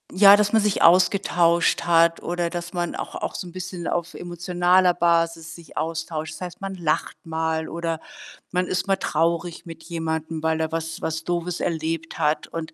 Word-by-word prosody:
ja, 200 +1 +9
dass 210 +1 +1
man 220 - +5
sich 210 -1 +1
ausgetauscht 175 -1 +4
hat 170 -1 +4
oder 175 -1 -2
dass 175 0 -5
man 175 -1 -2
auch - - -6
auch - - -3
so 185 - -5
'n - - -10
bisschen 180 -1 -6
auf 170 -1 -2
emotionaler 175 +1 +2
Basis 165 -1 +1
sich 170 -4 -14
austauscht. 160 0 -3
Das - - -12
heißt, 180 0 -7
man 195 0 -4
lacht 170 -4 -1
mal 160 0 -1
oder 165 -1 -3 0.5
man 180 0 0
ist 185 +2 -1
mal 195 - +2
traurig 170 0 -1
mit 165 -1 -10
jemandem, 160 -1 -3
weil 160 0 +1
er 160 0 -1
was 165 0 -4
was 160 0 -3
Doofes 175 0 -2
erlebt 165 0 -3
hat 150 +1 +1
und 165 -1 -6
170 Hz, 185 wpm, -23 LUFS, 160-180 Hz, 0.5 s, ja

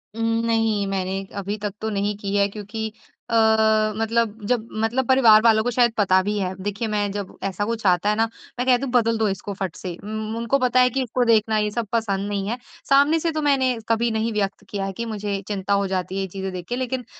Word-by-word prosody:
उ, 230 - -7 0.3
नहीं 225 -3 +1
मैंने 195 0 -2
अभी 200 +2 -3
तक 205 -2 -2
तो 220 - -1
नहीं 205 0 -1
की 200 -1 -3
है 200 0 +3
क्योंकि 215 +2 -5 0.4
अ, - - -4 0.6
मतलब 225 0 0
जब 230 -2 0 0.2
मतलब 245 +3 0
परिवार 235 -5 +6
वालों 220 -1 +5
को 245 - 0
शायद 240 0 +3
पता 190 -2 +4
भी 210 +1 -1
है 185 -1 -2
देखिए 205 +3 -2
मैं 205 -1 0
जब 200 -2 -6
ऐसा 195 +1 -2
कुछ 225 -1 -3
आता 180 +2 +3
है 210 - +2
ना? 225 +1 +2 0.3
मैं 250 - 0
कहती 250 +1 +4
हूँ 265 - -3
बदल 230 -2 +2
दो 220 - +1
इसको 195 +1 -4
फट 190 -3 -4
से 180 -2 -6
उन 215 +1 -4
उनको 235 +4 +1
पता 255 0 +2
है 250 0 +5
कि 265 +2 -1
उसको 250 +1 0
देखना 220 -1 +3
ये 210 0 +1
सब 230 -1 -3
पसंद 205 -4 -1
नहीं 200 -1 -2
है। 240 - -2 0.3
सामने 285 +4 +5
से 330 +1 0
तो 310 - -2
मैंने 265 -4 +2
कभी 230 +1 +2
नहीं 220 +1 -1
व्यक्त 200 -1 -2
किया 195 -2 -3
है 195 - -4
कि 235 - -3
मुझे 205 -2 -3
चिंता 200 -1 -1
हो 200 -1 +2
जाती 185 0 -3
है, 195 - -1
ये 190 - -2
चीज़ें 190 +1 -5
देख 180 -1 -6
के 245 - -1
लेकिन 255 -1 -3
215 Hz, 240 wpm, -23 LUFS, 200-235 Hz, 0.6 s, परिवार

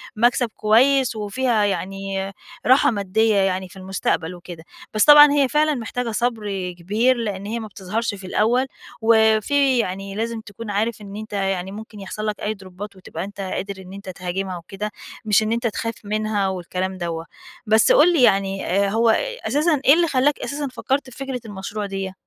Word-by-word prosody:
مكسب 240 +1 +2
كويّس 250 +3 +3
وفيها 220 +2 0
يعني 195 0 -3 0.3
راحة 270 +2 +5
مادية 215 +1 +1
يعني 190 -1 +1
في 180 - -14
المستقبل 185 -2 -2
وكده، 175 -2 -10 0.3
بس 215 - +3
طبعًا 295 -1 +9
هي 285 -2 +3
فعلًا 305 +2 +2
محتاجة 240 0 -3
صبر 210 -6 -2
كبير، 220 +9 +2
لأن 205 -4 -3
هي 230 +3 -3
ما 220 - -6
بتظهرش 205 +2 -3
في 190 -1 -10
الأوّل، 240 +7 +2 0.4
وفي 225 +5 +4
يعني 195 -1 -3
لازم 230 +1 -3
تكون 220 +1 -9
عارف 215 +2 -1
إن 200 -1 -9
أنت 215 0 -8
يعني 195 -2 -1
ممكن 215 0 -9
يحصل 215 +2 -5
لك 210 -1 -2
أي 210 - -1
دروبات 195 +1 -10
وتبقى 190 - -7
أنت 200 0 -7
قادر 195 0 -4
إن 185 +1 -12
أنت 200 -1 -9
تهاجمها 185 +1 -4
وكده. 195 +5 -6 0.3
مش 215 0 +4
إن 215 - -1
أنت 235 +1 0
تخاف 230 +1 -3
منها 210 -1 -1
والكلام 185 0 -3
دوّة. 165 -2 -4 0.4
بس 220 +1 +5
قُل 345 +4 +6
لي 315 - +3
يعني، 195 -3 +2
آآ، 200 +2 +1
هو 225 +2 +2 0.4
أساسًا 300 -1 +2
إيه 275 - +8
اللي 340 +1 +3
خلاك 280 0 +2
أساسًا 285 +3 -3
فكرت 270 +1 -2
في - - -14
فكرة 270 -2 -4
المشروع 205 0 -5
دِيّة؟ 195 -1 -4
210 Hz, 180 wpm, -22 LUFS, 195-235 Hz, 0.4 s, طبعًا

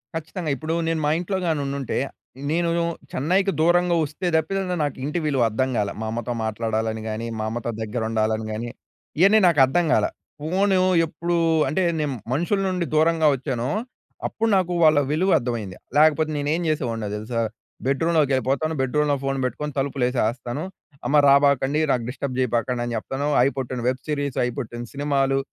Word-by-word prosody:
ఖచ్చితంగ! 165 +1 -5
ఇప్పుడు 155 +4 -3
నేను 165 -1 0
మా 150 - +2
ఇంట్లో 190 +2 -2
గాని 155 -3 +1
ఉండుంటే. 140 -2 -3 0.5
నేను 170 +1 +1 0.4
చెన్నైకి 185 +8 +1
దూరంగా 175 +1 +3
వస్తే 155 +5 -4
తప్పితే 195 +5 +1 0.2
నాకు 145 - -2
ఇంటి 150 +5 -1
విలువ 140 -4 +1
అర్ధం 130 +5 0
కాలే. 100 -1 0
మా 110 - -2
అమ్మతో 120 +1 -3
మాట్లాడాలని 110 0 -2
గాని, 110 +2 -4
మా 110 - -1
అమ్మతో 120 +1 -3
దగ్గర 110 +2 -3
ఉండాలని 110 0 0
గాని 115 +2 -4 0.5
ఇయన్నీ 200 +4 +6
నాకు 160 -5 +3
అర్థం 165 +6 +1
కాలా. - - +3 0.3
ఫోన్ 190 +6 +1 0.3
ఎప్పుడూ 170 +2 -3 0.3
అంటే 190 +5 0 0.2
నేను 150 -2 -1 0.2
మనుషుల 175 +7 +1
నుండి 180 -2 -1
దూరంగా 160 0 +4
వచ్చానో, 130 -1 -3 0.6
అప్పుడు 225 0 -1
నాకు 180 -1 0
వాళ్ళ 155 -2 +6
విలువ 185 +5 +2
అర్థమైంది. 115 -7 -4 0.2
లేకపోతే 155 0 +4
నేను 145 0 -1
ఏం 175 - -2
చేసేవాడినో 115 -9 -2
తెలుసా? 115 +2 -2 0.4
బెడ్‌రూమ్‌లోకి 150 +1 +2
వెళ్ళిపోతాను 135 +5 0
బెడ్‌రూమ్‌లో 145 +2 +1
ఫోన్ 135 0 -1
పెట్టుకొని. 150 +3 -3
తలుపులు 135 -1 -1
వేసేస్తాను. 120 +3 -2 0.4
అమ్మ 150 - +3
రాబాకండి, 140 +1 +4
నాకు 125 - +1
డిస్టర్బ్ 130 -1 -4
చేయబాకండి" 125 0 0
అని 120 -1 -3
చెప్తాను. 135 +6 -3
అయి 135 - +3
పుట్టిన 130 -1 -3
వెబ్ 130 0 -3
సీరీస్. 145 -3 -2
అయి 125 - -1
పుట్టిన 120 -1 -5
సినిమాలు. 135 -1 +1
140 Hz, 160 wpm, -23 LUFS, 120-160 Hz, 0.6 s, ఇయన్నీ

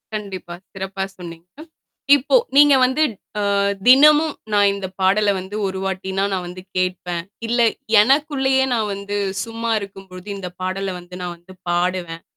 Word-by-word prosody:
கண்டிப்பா, 190 -4 -6 0.2
சிறப்பாக 190 0 -4
சொன்னீங்க. 170 -1 -10 0.7
இப்போ 285 - +1 0.2
நீங்க 290 -1 +7
வந்து 260 +4 +2 0.4
அ - - 0 0.5
தினமும் 300 +4 +6 0.2
நான் 205 -1 +5
இந்த 195 -1 -5
பாடல 205 +2 +3
வந்து 190 +3 -8
ஒரு 190 0 -4
வாட்டினா 190 0 -2
நான் 180 -1 -2
வந்து 180 +1 -9 0.2
கேட்பேன். 180 -2 -2 0.2
இல்ல, 240 +1 0 0.4
எனக்குள்ளேயே 270 +1 +2
நான் 215 -3 0
வந்து 200 +1 -4 0.3
சும்மா 230 0 -5
இருக்கும்பொழுது 195 -1 -11
இந்த 180 -2 -6
பாடல 190 +1 -2
வந்து 175 +1 -12
நான் 175 -1 -5
வந்து 180 +2 -16 0.2
பாடுவேன் 175 -1 -2
195 Hz, 140 wpm, -20 LUFS, 185-230 Hz, 0.7 s, நீங்க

